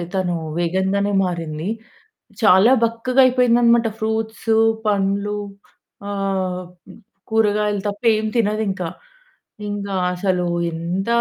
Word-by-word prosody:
తను 180 -2 0 0.2
వేగన్‌గానే 190 +4 0
మారింది. 165 -1 -4 0.7
చాలా 210 +2 +6
బక్కగా 230 +3 +2
అయిపోయిందనమాట. 240 -2 +4
ఫ్రూట్స్ 220 0 -2 0.3
పండ్లు, 200 0 0 0.7
ఆహ్, 190 -2 -2 0.7
కూరగాయలు 210 -2 +1
తప్ప 205 0 -5 0.2
ఏమి 215 0 -2
తినదింకా. 205 -5 0 0.8
ఇంకా 200 -1 -4 0.2
అసలు 180 -1 0 0.3
ఎంత, 170 +4 -3
200 Hz, 85 wpm, -20 LUFS, 185-220 Hz, 0.8 s, చాలా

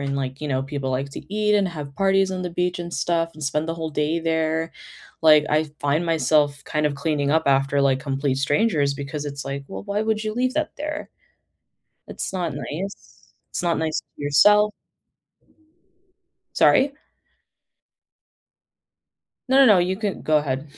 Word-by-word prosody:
and 140 0 -2
like, 130 -1 -4
you 150 - -3
know, 130 -1 0
people 135 -1 -4
like 130 +2 -2
to 200 - -8
eat 210 0 +2
and 200 -2 +3
have 150 -5 -7
parties 195 0 +3
on 185 -1 -3
the 180 - -3
beach 180 +1 -1
and 170 0 -6
stuff 165 -1 0
and 155 -1 -12
spend 150 +3 -1
the 165 - -2
whole 160 -1 -4
day 150 +2 0
there, 160 0 0 0.5
like, 155 -1 +6
I 155 0 +1
find 145 +4 +1
myself 150 -3 +2
kind 150 0 -1
of 150 - +1
cleaning 145 0 -1
up 160 +2 +2
after, 140 +1 +2
like, 135 -1 +2
complete 135 -1 -1
strangers 145 0 +2
because 145 +1 -5
it's 140 -1 -6
like, 140 0 -4
"Well, - - -7
why 205 +1 -2
would 220 0 -1
you 215 0 -3
leave 255 +1 0
that 310 0 -1
there?" 305 +1 -5 1.0
It's - - -5
not 175 -4 -2
nice. 190 +6 -7 0.2
It's - - -3
not 170 -3 +1
nice 160 -1 -1
to - - -15
yourself. 210 +9 +5 1.8
Sorry? 275 +2 +4 2.6
No, 270 +1 +6
no, 210 -5 +7
you 180 +2 +1
can 205 -2 -3
go 155 -1 +3
ahead. 135 -2 -3
155 Hz, 170 wpm, -23 LUFS, 140-190 Hz, 2.6 s, no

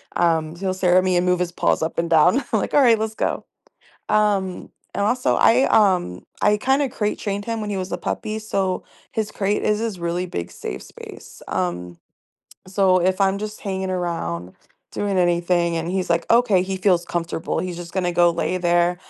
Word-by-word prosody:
Um, 165 -2 +1
he'll 185 +1 -2
stare 185 -1 +3
at 185 - +4
me 185 -1 +1
and 175 - +1
move 180 0 +2
his 180 -1 -1
paws 170 - +1
up 160 - -2
and 170 - -1
down. 165 - +5
I'm - - +2
like, - - -4
"Alright, 250 -6 +5
let's 220 0 -3
go." - - -2 0.6
Um 205 -3 0 0.2
and, 200 - 0
also, 250 +3 +1
I, 245 +4 +4
um 180 - +2 0.2
I 210 - +4
kinda 270 +5 +1
crate 210 -3 -2
trained 205 0 -3
him 230 -1 -3
when 210 - -4
he - - -2
was 185 -1 -4
a 175 - -2
puppy, 215 +4 -3
so 195 -4 -2 0.3
his 220 -1 -2
crate 205 +1 -1
is 210 0 +1
his 220 -5 -3
really 170 +1 -2
big 85 - -5
safe 60 - -6
space, - - -12
um, 90 -1 -3 0.7
so 185 -1 +3
if 185 +2 +1
I'm 195 0 +2
just 210 +1 -6
hanging 190 -1 -3
around, 165 - -3 0.4
doing 200 -2 -1
anything 175 -1 +1
and 165 +1 -3
he's 185 -1 -2
like, 170 0 +1
okay, 230 -6 +4
he 190 0 -3
feels 185 -2 +2
comfortable, 165 -2 -3
he's 180 +1 -3
just 170 -1 -8
gonna 180 -2 -1
go 175 0 +4
lay 170 +2 -1
there. 175 0 +2
185 Hz, 200 wpm, -22 LUFS, 170-205 Hz, 0.7 s, down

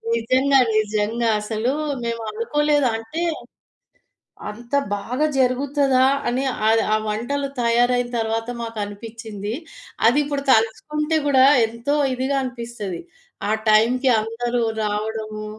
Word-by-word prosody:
నిజంగా, 260 +4 +3 0.2
నిజంగా. 215 +2 0
అసలు 220 +4 -1 0.3
మేమనుకోలేదు. 235 +6 0
అంటే 225 +10 -6 1.3
అంత 235 +5 -9 0.2
బాగా 250 +9 -1
జరుగుతదా? 265 +1 +2 0.2
అని 255 +3 0 0.2
ఆహ్, 225 0 +4
ఆ - - +4
వంటలు 275 +7 -2
తయారైన 245 +1 +2
తర్వాత 225 +1 -2
మాకు 225 -1 -6
అనిపిచ్చింది. 215 0 -7 0.5
అదిప్పుడు 285 +2 +1
తలుచుకుంటే 300 +8 +1
గూడా 265 -2 +5 0.2
ఎంతో 235 +6 -2 0.2
ఇదిగా 260 +2 -1
అనిపిస్తది. 235 -7 -6 0.5
ఆ - - 0 0.2
టైంకి 250 +5 +4
అందరూ 240 +2 -2 0.2
రావడము. 215 0 -3
235 Hz, 100 wpm, -22 LUFS, 220-265 Hz, 1.3 s, గూడా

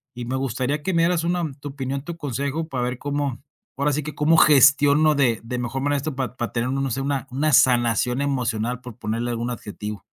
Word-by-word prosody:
y 120 - -5
me 130 +2 -3
gustaría 135 +3 -2
que 190 - -1
me 165 - +3
dieras 170 -1 +1
una 175 -3 -1
tu 145 - -6
opinión, 135 0 -4
tu 170 0 -6
consejo, 140 +3 -3
para 125 -2 -2
ver 125 0 -4
cómo 145 -3 -2 0.4
ahora 145 +1 +1
sí 150 +1 -1
que, 155 - -6
cómo 160 +2 +3
gestiono 145 +1 +6
de 125 -5 +2
de 125 +2 -4
mejor 125 +2 -3
manera 145 0 +1
esto, 145 +1 -4
para 130 -2 -3
para 120 - -3
tener, 120 +2 -1
no 135 -1 -1
sé, 135 - -2
una 140 -1 -2
una 150 +3 0
sanación 125 +1 +3
emocional 125 -3 -1
por 125 -2 -10
ponerle 115 +2 -2
algún 120 +1 -3
adjetivo. 105 -2 -7
135 Hz, 220 wpm, -23 LUFS, 120-145 Hz, 0.4 s, gestiono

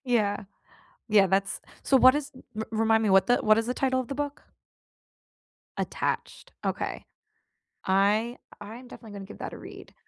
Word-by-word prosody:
Yeah. 210 -5 +1 0.6
Yeah, 205 -3 +5
that's 195 +1 0 0.2
so, 270 - +4
what 255 +1 +7
is 295 0 -3 0.3
r 220 - -2
remind 220 0 +3
me 210 - +2
what 190 0 +5
the 245 - +4
what 215 +1 +4
is 225 - -2
the 250 - -1
title 260 -1 +1
of 255 - -4
the 275 - -5
book? 290 0 -4 1.4
Attached, - - -3
okay. - - -3 0.8
I 210 +6 +2 0.2
I'm 230 +5 -10
definitely 225 -4 -12
gonna 200 -1 -8
give 210 - -12
that - - -6
a - - -8
read. - - -12
220 Hz, 165 wpm, -27 LUFS, 205-255 Hz, 1.4 s, what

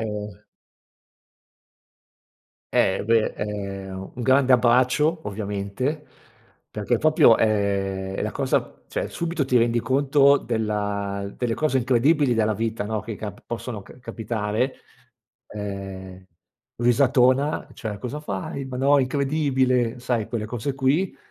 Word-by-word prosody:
ehm 105 -2 -6 2.3
Eh, 95 +1 +2
beh, 115 0 +2
ehm, 95 -2 -5
un 125 - -4
grande 130 +1 +4
abbraccio 125 +6 +3
ovviamente, 105 +8 -3 0.6
perché 105 +3 -1
proprio, 155 -6 +5
ehm, 100 -3 0
è - - -2
la - - -2
cosa - - -1
cioè - - -3
subito 170 -4 -2
ti 130 -1 +1
rendi 120 0 +3
conto 140 +3 +4
della 100 -4 -2
delle 120 -2 -1
cose 150 -4 +1
incredibili 130 +2 +3
della 110 -1 +1
vita, 110 0 -2
no, 110 0 -2
che 110 +1 -6
cap 105 -1 -7
possono 115 -2 -5
c 115 - -16
capitare. 110 +1 -2 0.7
Uhm, 95 -2 -7 0.6
risatona: 130 +3 +3
"Cioè 105 -3 -6
cosa 125 +7 -5
fai? 135 +2 -4
Ma 130 -1 -6
no, 140 +3 +4
incredibile!" 130 -3 +1
Sai 120 -3 -1
quelle 115 -2 -3
cose 120 +4 -3
qui. 135 +8 +1
115 Hz, 120 wpm, -24 LUFS, 105-130 Hz, 2.3 s, proprio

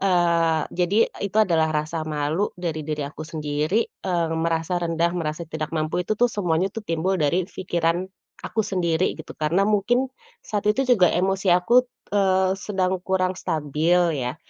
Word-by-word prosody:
Eee, 170 -4 +2
jadi 185 +5 +3 0.2
itu 200 +2 -4
adalah 160 -6 +2
rasa 155 +1 -2
malu 155 +5 -1
dari 160 -3 -3
diri 150 -1 -3
aku 155 +2 -8
sendiri, 155 +5 -1 0.2
eee, 170 -3 0
merasa 165 +1 0
rendah, 170 -1 +1
merasa 155 0 -3
tidak 155 0 -4
mampu 160 +3 -1
itu 215 - -1
tuh 245 - +5
semuanya 180 -3 0 0.2
timbul 175 +3 0
dari 175 +4 +1
pikiran 175 -1 -1 0.4
aku 220 - -1
sendiri 180 -4 0
gitu, - - -9
karena 165 +6 +1
mungkin, 215 +5 +2 0.4
saat 210 -1 -2
itu 265 +6 +2
juga 220 -9 +5
emosi 190 +2 0
aku, 235 +9 +4 0.3
eee, 190 -2 +3
sedang 190 -2 -1
kurang 185 0 0
stabil 155 +3 +1 0.2
ya, 125 +4 -3
175 Hz, 155 wpm, -23 LUFS, 160-190 Hz, 0.4 s, tuh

